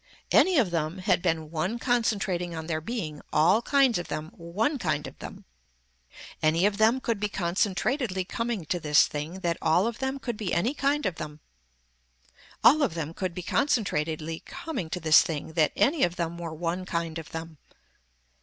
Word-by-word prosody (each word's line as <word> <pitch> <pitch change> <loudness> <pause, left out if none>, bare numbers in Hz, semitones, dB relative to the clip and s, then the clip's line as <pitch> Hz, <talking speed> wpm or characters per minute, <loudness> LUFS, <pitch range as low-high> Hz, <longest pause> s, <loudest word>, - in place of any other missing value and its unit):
Any 370 -3 +5
of 220 -10 +3
them 165 +1 -1
had 185 -1 +1
been 160 -3 -1
one 175 +8 -1
concentrating 200 -8 0
on 160 0 -5
their 160 -1 -2
being, 160 -7 -4
all 175 +9 +4
kinds 270 -5 +3
of 175 - -6
them, 155 +1 -4
one 210 - -2
kind 155 -6 -1
of - - -10
them. - - -9 1.0
Any 160 +4 +3
of 205 0 +1
them 225 +4 +4
could 230 -5 -2
be 210 0 -1
concentratedly 195 - 0
coming 230 -6 -3
to 175 +3 -1
this 150 -2 +5
thing 155 +5 -5
that 170 -3 -1
all 175 +5 +3
of 235 0 -3
them 265 +1 -2
could 240 -5 -4
be 205 -5 -2
any 230 +10 +1
kind 290 -1 0
of 185 -4 -1
them. 150 0 -7 1.2
All 305 +5 +7
of 240 - +1
them 160 -1 -4
could 185 -1 -4
be 180 - -5
concentratedly 165 - 0
coming 295 - -5
to 180 - -3
this 160 -1 +6
thing 160 0 -4
that 155 -2 +3
any 295 +1 +2
of 175 0 +1
them 170 -1 -2
were 170 -2 -5
one 170 +3 -3
kind 170 -2 -3
of 160 - -10
them. 160 -2 -7
175 Hz, 185 wpm, -27 LUFS, 160-230 Hz, 1.2 s, All